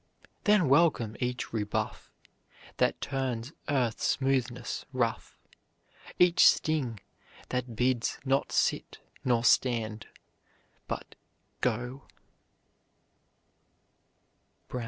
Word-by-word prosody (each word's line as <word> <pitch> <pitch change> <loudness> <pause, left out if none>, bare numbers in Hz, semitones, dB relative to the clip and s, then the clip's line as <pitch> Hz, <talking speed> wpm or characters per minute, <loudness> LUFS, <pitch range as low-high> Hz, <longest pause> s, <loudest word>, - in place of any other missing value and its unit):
Then 205 -6 +4
welcome 135 -7 +3
each 125 -2 -3
rebuff, 110 0 -3 0.7
That - - +1
turns 130 -1 -3 0.2
earth's 125 -6 0
smoothness 130 -3 -1
rough, 120 -3 -2 0.8
Each 180 -1 +6
sting, 135 -9 0 0.5
that 125 -2 -3
bids 125 0 +1
not 135 +1 +1
sit - - 0 0.3
nor 120 -2 +2
stand 115 -3 +2 0.8
but - - -5 0.5
go. 125 +2 -2
125 Hz, 75 wpm, -29 LUFS, 115-135 Hz, 0.8 s, Each